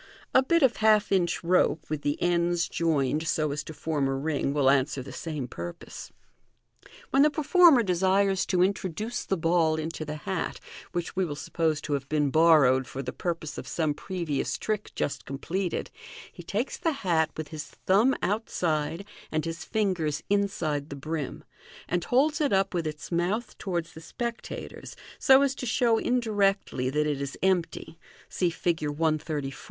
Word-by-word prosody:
A 260 - +7
bit 335 +4 +2
of 255 -3 +4
half 215 -1 +4
inch 180 -3 +1
rope, 170 -2 +2
with 155 -1 -3
the 145 0 -1
ends 175 -1 +1
joined 155 -2 0
so 155 -1 +1
as 145 +1 -3
to - - -7
form 150 -2 -1
a 135 - -1
ring, 140 0 -1
will 140 -2 +2
answer 135 -1 +1
the - - -9
sama 150 -5 -4
purpose. 85 -7 -8 0.7
MODERN - - -19
MAGIC - - -19
3*5 - - -21
When 270 - +4
the 300 - +6
performer 305 -2 +5
desires 190 +1 +2
to 185 - 0 2.4
which 175 -1 -3
we 190 - +1
will 150 -4 -4
suppose 155 0 -1
to 150 - -3
have 140 -1 -3
been 150 -2 +1
borrowed 150 -5 +5
for 135 - -5
the 125 - -5
purpose 165 -4 -4
of - - -8
some 155 -3 0
previous 165 -3 -3
trick 215 -1 -3
just 145 - -2
completed; 170 +7 -3 0.4
he - - -10
takes 205 +9 -3
the 330 -3 +1
hat 160 -3 +3
with 155 -2 -5
his 155 -2 -6
thumb 215 +8 +2
out 215 +4 -1
side 160 +2 -1 0.3
and 155 0 -1
his 165 0 -4
fingers 185 -9 -1
inside 165 -8 0
the 140 - -6
brim, 150 0 -4 0.4
and 175 0 -1
holds 300 +5 +2
it 290 - +2
up 195 0 +2
with 170 -3 -1
its 150 +1 -7
mouth 180 +7 -1
to - - -6
wards 170 -2 -2
the 160 - -11
spectators, 235 +6 -6 0.2
so 270 +1 +6
as 275 -1 +1
to 250 - -6
show 230 -1 +3
indirectly 200 - +1
that 150 +3 +1
it 145 -2 -1
is 140 0 -5
empty 175 -3 0 0.3
(see 180 - 0
Fig. 165 -2 -1
1 155 +1 +1
34). 140 -4 -4
165 Hz, 170 wpm, -27 LUFS, 150-200 Hz, 2.4 s, A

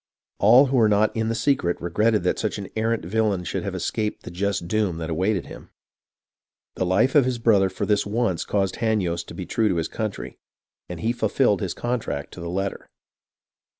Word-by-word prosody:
All 120 +7 +7
who 135 -1 0
were 110 -3 +5
not 105 +1 +2
in 110 0 0
the 115 - -1
secret 115 -7 +1
regretted 105 +4 +1
that 90 - 0
such 110 - -2
an 100 -2 -7
arrant 110 -3 0
villain 105 -1 0
should 80 - -3
have - - -4
escaped 105 -1 -2
the - - -8
just 95 -1 -2
doom 100 -3 0
that 80 0 -4
awaited 95 +3 0
him. - - -11 1.0
"The 90 - -2
life 100 +8 +3
of 145 - +6
his 130 -1 -1
brother 105 -5 +3
for 95 - -3
this 105 -1 +2
once 100 -4 -1
caused 100 -2 -1
Hanyost 95 -7 -1
to - - -9
be - - -5
true 110 -2 +1
to 90 - 0
his 80 -1 -1
country, 110 -3 -5 0.5
and 90 -2 -6
he 115 - +1
fulfilled 110 -2 +1
his 95 -4 -3
contract 120 -12 -3
to - - -10
the 85 0 -5
letter. 95 +2 -3
105 Hz, 200 wpm, -24 LUFS, 90-110 Hz, 1.0 s, All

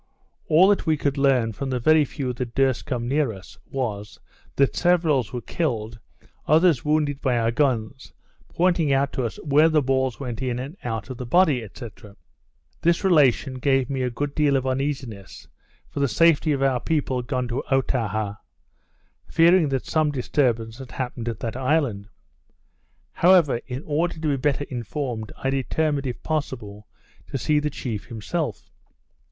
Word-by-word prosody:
All 170 +5 +6
that 205 - +1
we 155 -1 +3
could 140 -1 -1
learn 135 -5 +2
from 135 +5 -5
the 130 -1 -1
very 155 +4 +4
few 130 -2 -4
that 120 -1 -5
durst 135 -2 +1
come 120 -2 -2
near 140 -1 +1
us, 95 -4 -12
was, 105 -6 -4 0.4
that 140 -1 +2
severals 165 - +2
were 125 - -4
killed, 120 -8 -3 0.5
others 160 -3 +4
wounded 150 -2 0
by 130 -4 +1
our 115 0 +1
guns, 130 -2 -1 0.4
pointing 170 -4 +1
out 135 +1 +1
to 130 - -1
us 115 - -4
where 150 +2 +4
the 155 -1 +3
balls 130 -1 0
went 125 -3 -5
in 125 -2 -1
and 135 +6 -6
out 110 -2 -4
of 130 - -7
the 125 - -5
body, 150 -5 +3
&c. 120 - -7 0.9
This 170 +2 +2
relation 140 -7 +3
gave 135 0 +1
me 135 -1 -2
a 125 - 0
good 140 +4 -3
deal 145 -2 +2
of 130 - -2
uneasiness 130 -7 -4 0.4
for - - -6
the 140 - +2
safety 160 +1 +3
of 135 -2 0
our 130 -2 +2
people 135 -3 -1
gone 125 +1 -2
to 120 - -2
Otaha, 110 -6 0 0.9
fearing 165 -1 +4
that 135 -2 -2
some 155 -1 +1
disturbance 120 -4 -1
had 130 -2 -10
happened 125 -2 -4
at 115 - -6
that 115 0 -3
island. 130 -7 0 1.0
However, 170 -9 +4
in 130 +3 -5
order 160 +3 0
to - - -11
be 140 - +2
better 145 +1 0
informed, 120 -2 -4
I 135 - -1
determined, 140 +1 -1
if 125 - -6
possible, 120 -9 -4 0.4
to - - -3
see 150 +3 +1
the 150 0 -1
chief 115 -7 -5
himself. 115 - -4
135 Hz, 170 wpm, -24 LUFS, 120-150 Hz, 1.0 s, All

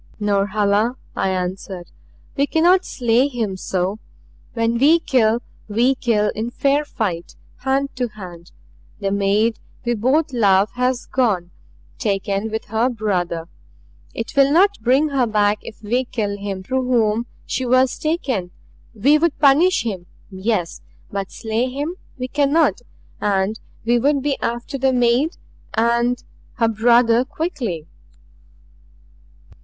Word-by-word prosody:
"Norhala," 205 +2 +1 0.2
I 190 - 0
answered, 185 -1 -4 0.4
"we 280 0 +1
cannot 355 +5 +3
slay 245 +1 +2
him 230 -8 -3
so. 185 +2 -2 0.5
When 230 0 0
we 300 +6 +6
kill, 235 -6 +2 0.2
we 235 +5 +2
kill 220 -5 +1
in 225 +2 -3
fair 280 +4 +1
fight 185 -11 -3 0.2
hand 270 +1 -1
to 250 -1 0
hand. 180 -6 -11 0.5
The 195 -1 -1
maid 205 +3 +1 0.3
we 240 - +1
both 265 +7 +1
love 200 -3 +3
has 250 0 -1
gone, 200 -9 0 0.5
taken 200 -1 -1
with 220 0 -4
her 225 +4 +1
brother. 180 -8 -2 0.7
It - - -5
will 275 0 +5
not 390 +6 +4
bring 270 +5 +3
her 265 -4 +1
back 210 -1 +2
if 220 - -11
we 245 +5 +1
kill 210 -5 -2
him 200 -2 -5
through 260 +4 -1
whom 230 -1 +2 0.2
she 260 - -2
was 255 +1 +3
taken. 270 - -1 0.5
We 280 +8 +4
would 335 -1 +1
punish 315 +7 +4
him 190 -6 -4 0.2
yes, 190 -2 -2 0.3
but 195 -1 -4
slay 225 +3 -2
him 290 +6 -3 0.2
we 255 -1 -3
cannot. 285 - +2 0.4
And 200 +1 0 0.3
we 240 +1 +3
would 280 +2 +2
be 285 -1 +1
after 240 +4 -3
the 265 0 +2
maid 245 +6 +2 0.4
and 235 +2 +1 0.3
her 230 -2 +1
brother 235 +2 +4
quickly." 270 - -4
235 Hz, 135 wpm, -20 LUFS, 205-265 Hz, 0.7 s, we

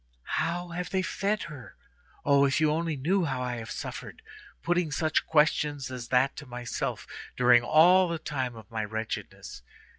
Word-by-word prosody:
How 175 +2 -2
have 175 +1 -4
they 190 -1 0
fed 200 +2 -1
her? 145 -7 -10 0.5
Oh! 140 -1 +5
if 135 +2 +1
you 155 -1 +3
only 165 0 -1
knew 175 +7 +1
how 135 -4 -2
I 125 -1 -3
have 115 0 -7
suffered, 295 - -7 0.4
putting 175 -1 +1
such 155 +1 0
questions 150 -3 +2
as 125 -2 -6
that 130 +2 +2
to 145 - -8
myself 120 -1 -4 0.3
during 125 -1 +6
all 175 +8 +5
the 170 -1 -2
time 130 -6 -3
of 110 +1 -13
my 110 -1 -2
wretchedness. 110 +1 -6
145 Hz, 170 wpm, -28 LUFS, 125-170 Hz, 0.5 s, during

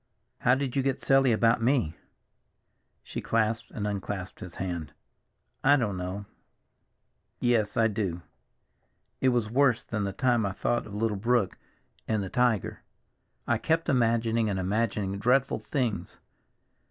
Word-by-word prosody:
"How 125 +1 +4
did 135 -1 -3
you 135 - +3
get 135 -1 0
silly 135 -2 +4
about 115 +1 +3
me?" 115 - +1 1.1
She - - -6
clasped 115 0 0
and 105 - -4
unclasped 100 -2 -4
his 90 - -9
hand. 85 -6 -4 0.7
"I 140 +2 +6
don't 110 -7 -1
know. 90 +3 -4 1.1
Yes, 115 -4 +1
I 115 - +5
do. 100 -6 -3 1.0
It 130 - +3
was 120 -3 0
worse 130 -2 +3
than 105 -3 -2
the 100 - -1
time 120 +3 +1
I 100 -1 -1
thought 120 +3 -1
of 100 - -8
little 105 -1 0
Brook 115 -2 +1 0.5
and 110 -2 0
the 95 - -5
tiger. 120 -4 +1 0.6
I - - +1
kept 165 +1 0
imagining 115 -3 +2
and 100 - -1
imagining 100 0 -1
dreadful 125 +5 +2
things. 115 - -2
115 Hz, 140 wpm, -28 LUFS, 100-125 Hz, 1.1 s, I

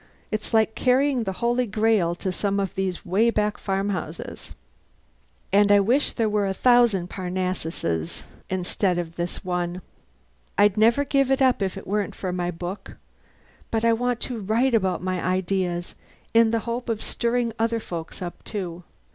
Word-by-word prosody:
It's 215 0 -3
like 220 -1 +3
carrying 260 0 +2
the 190 - -1
Holy 240 +1 +2
Grail 210 -4 +2
to 185 +1 -3
some 200 +2 -1
of 195 -2 -2
these 190 -2 -3
way 205 +6 +3
back 210 -2 0
farmhouses. 195 -4 -3 1.0
And 205 0 +5
I 205 - +7
wish 245 +9 +2
there 225 -2 +1
were 210 -1 +1
a 190 - -2
thousand 235 -6 +4
Parnassuses 180 - -3 0.3
instead 185 0 0
of 170 -1 -3
this 175 +2 -4
one. 180 0 -2 0.7
I'd 205 -1 +5
never 230 +6 +4
give 275 -1 +2
it 270 0 +3
up 260 -4 +3
if 195 0 -1
it - - -8
weren't 205 0 -1
for 185 -2 -3
my 175 -1 -1
book: 175 +3 -6 0.7
but 225 0 0
I 230 - +5
want 245 +1 0
to 245 -3 -4
write 225 +6 +1
about 190 -5 +1
my 185 -1 -1
ideas 185 -1 -1 0.4
in 230 0 +6
the 230 0 0
hope 235 +1 -3
of 225 -2 -1
stirring 235 -1 0
other 230 0 +1
folk 165 -6 -6
up, 175 - -7
too. 180 -4 -5
205 Hz, 165 wpm, -24 LUFS, 180-230 Hz, 1.0 s, I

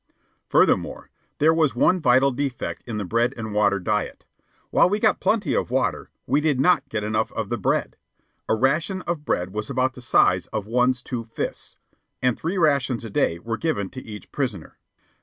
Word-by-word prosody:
Furthermore, - - +2 0.3
there 155 +2 +4
was 155 -7 +2
one 180 +9 +3
vital 135 -2 +4
defect 135 -1 -3
in 115 -3 -4
the 105 - -3
bread 120 +6 0
and 110 -2 -5
water 100 -1 +3
diet. 90 - -2 0.5
While - - +5
we 205 - +1
got 215 0 +2
plenty 215 -2 +1
of - - -1
water, 130 -3 -1 0.2
we 140 +4 +2
did 150 -4 +1
not 145 -2 +3
get 105 -3 -2
enough 110 +1 -1
of 110 -3 -3
the 120 - -1
bread. - - -1 0.5
A - - +3
ration 155 - 0
of 165 -4 -3
bread 90 +1 -1
was 105 0 -4
about 130 -1 0
the 125 - -11
size 90 -6 +3
of 105 -2 -4
one's 125 +3 +1
two 120 -3 -4
fists, 115 - -5 0.4
and 125 -2 +1
three 170 +5 -3
rations 140 -8 +1
a 110 - -7
day 85 - +1
were 115 +6 -4
given 150 - -2
to 130 - -8
each 105 -2 -10
prisoner. 115 - -4
125 Hz, 190 wpm, -23 LUFS, 110-145 Hz, 0.5 s, While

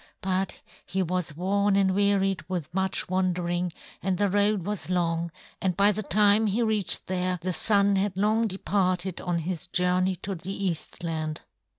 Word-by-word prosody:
But 190 0 -1 0.2
he 190 +1 -1
was 180 -4 -2
worn 200 +2 +2
and 195 -1 +3
wearied 195 -1 +2
with 175 -4 -4
much 190 0 0
wandering, 180 -1 0 0.3
and 190 -2 0
the 205 -1 +1
road 205 -2 +2
was 205 -3 -3
long; 170 -2 0 0.3
and 185 -3 0
by 200 +1 +5
the 210 +1 -3
time 210 +1 +3
he 215 +4 +1
reached 215 -3 +1
there, 185 0 -1
the 185 0 -1
Sun 200 +2 +3
had 190 -1 -1
long 215 +3 +2
departed 185 -2 -1
on 175 -2 -1
his 170 0 -3
journey 180 +1 +1
to 195 +3 -5
the 190 +3 -4
Eastland." 160 -2 -3
190 Hz, 165 wpm, -27 LUFS, 180-200 Hz, 0.3 s, by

